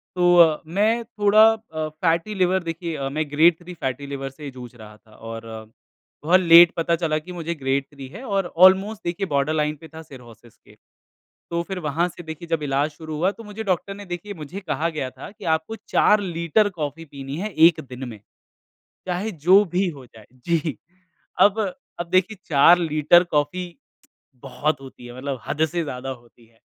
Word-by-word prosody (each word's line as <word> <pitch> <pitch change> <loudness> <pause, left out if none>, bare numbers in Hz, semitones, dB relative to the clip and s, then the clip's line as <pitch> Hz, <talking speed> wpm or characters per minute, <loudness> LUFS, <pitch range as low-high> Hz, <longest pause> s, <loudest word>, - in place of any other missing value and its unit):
तो 175 -3 +5
मैं 215 +7 +1
थोड़ा 215 -1 +4
अ, 160 -9 -6
फैटी 165 +6 -1
लिवर 185 0 +1
देखिए 165 -4 -4
मैं 155 +1 -3
ग्रेड 160 +2 +4
थ्री 180 0 -10
फैटी 135 -2 -4
लिवर 135 -1 -5
से 145 0 -9
जूझ 125 -2 -11
रहा 105 -2 -13
था 110 -1 -22
और 115 0 -9 0.7
बहुत 175 +4 +5
लेट 170 -1 +8
पता 170 0 +1
चला 155 -2 0
कि 180 +4 -11
मुझे 170 0 -4
ग्रेड 135 -1 -1
थ्री 140 -2 -10
है 205 - -10
और 195 -4 0 0.2
ऑलमोस्ट 195 +3 +3
देखिए 175 +3 -2
बॉर्डर 140 0 0
लाइन 150 0 0
पे 160 - -11
था 160 - -8
सिरहोसिस 120 -4 -15
के। - - -21 0.8
तो 170 - 0
फ़िर 190 +1 -5
वहाँ 160 +2 0
से 175 - -11
देखिए 160 +1 -8
जब 165 -2 0
इलाज 140 +1 0
शुरू 155 +1 -8
हुआ 185 +5 +1
तो 230 - -13
मुझे 210 +1 -7
डॉक्टर 195 0 -1
ने 205 0 -10
देखिए 180 +3 -6
मुझे 160 +5 -8
कहा 165 -3 -2
गया 150 -5 -4
था - - -10
कि 210 -1 -13
आपको 160 +7 -3
4 210 - +4
लीटर 175 +3 +1
कॉफ़ी 155 +2 -4
पीनी 135 -1 -8
है 210 +3 -3 0.2
1 160 -2 0
दिन 130 0 -7
में। 110 - -10 0.9
चाहे 185 +5 -2
जो 185 +5 +5
भी 190 +1 +2
हो 140 -6 -10
जाए। 110 -2 -17 0.2
जी 165 -4 0 0.7
अब 205 +2 +5 0.4
अब 175 0 -4
देखिए 185 +4 +1
4 160 +4 +6
लीटर 160 +1 +4
कॉफी 150 +5 0 0.8
बहुत 145 +2 -2
होती 130 -2 -12
है। 120 +1 -10
मतलब 135 -1 -5
हद 155 - +1
से 170 +2 -2
ज़्यादा 130 -1 -6
होती 120 -2 -13
है। 115 0 -29
165 Hz, 190 wpm, -23 LUFS, 140-180 Hz, 0.9 s, लेट